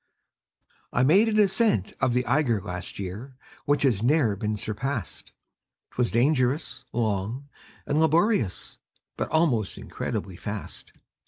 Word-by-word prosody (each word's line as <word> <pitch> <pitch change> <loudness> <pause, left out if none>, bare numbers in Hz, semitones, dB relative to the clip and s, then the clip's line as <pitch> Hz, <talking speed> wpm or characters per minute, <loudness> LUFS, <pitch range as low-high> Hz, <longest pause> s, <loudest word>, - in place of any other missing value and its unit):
I 125 - +2
made 195 +11 +5
an 215 - 0
ascent 205 - +2
of 130 -2 +2
the 125 0 +1
Eiger 125 -4 +2
Last 90 -1 -6
year, 105 +8 -6 0.3
which 145 0 +2
has 120 -8 +2
ne'er 125 -4 +3
been 105 +2 -2
surpassed; 110 - -4 0.6
'Twas 125 -1 0
dangerous, 130 +1 +1
long, 115 +4 -2 0.4
and 145 +1 +1
laborious, 160 - +1 0.4
But - - -3
almost 140 - +1
incredibly 95 -3 -5
fast. 105 +1 -7
125 Hz, 120 wpm, -26 LUFS, 105-150 Hz, 0.6 s, made